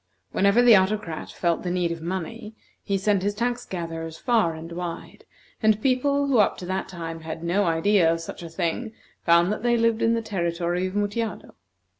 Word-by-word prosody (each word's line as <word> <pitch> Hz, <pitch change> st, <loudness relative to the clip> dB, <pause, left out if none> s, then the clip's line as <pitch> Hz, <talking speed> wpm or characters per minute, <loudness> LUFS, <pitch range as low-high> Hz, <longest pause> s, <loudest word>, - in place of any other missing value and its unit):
Whenever 200 Hz, +5 st, +4 dB
the 240 Hz, -3 st, +8 dB
Autocrat 190 Hz, -3 st, 0 dB
felt 170 Hz, -2 st, 0 dB
the 180 Hz, -, -3 dB
need 175 Hz, -1 st, 0 dB
of 165 Hz, -1 st, -5 dB
money, 190 Hz, +6 st, -5 dB, 0.3 s
he 200 Hz, -1 st, 0 dB
sent 200 Hz, 0 st, +1 dB
his 205 Hz, +1 st, -1 dB
tax 245 Hz, +2 st, -2 dB
gatherers 165 Hz, -2 st, -5 dB
far 220 Hz, -10 st, +1 dB
and 165 Hz, +1 st, -9 dB
wide, 170 Hz, 0 st, -6 dB, 0.4 s
and 215 Hz, -1 st, +3 dB
people 280 Hz, +3 st, +2 dB
who 270 Hz, -4 st, +3 dB
up 210 Hz, -, +3 dB
to 180 Hz, -, -7 dB
that 190 Hz, +1 st, -3 dB
time 165 Hz, -2 st, -6 dB
had 160 Hz, 0 st, -7 dB
no 185 Hz, +4 st, +1 dB
idea 165 Hz, +1 st, +3 dB
of 165 Hz, -, -1 dB
such 165 Hz, -, -8 dB
a 170 Hz, -, -7 dB
thing 180 Hz, +7 st, -2 dB, 0.3 s
found 170 Hz, +2 st, +4 dB
that 210 Hz, -, -3 dB
they 240 Hz, 0 st, +2 dB
lived 230 Hz, -1 st, +2 dB
in 230 Hz, 0 st, +3 dB
the 230 Hz, -, -1 dB
territory 175 Hz, -2 st, -1 dB
of 185 Hz, -, -7 dB
Mutjado. 205 Hz, +2 st, -2 dB
190 Hz, 195 wpm, -25 LUFS, 170-220 Hz, 0.4 s, the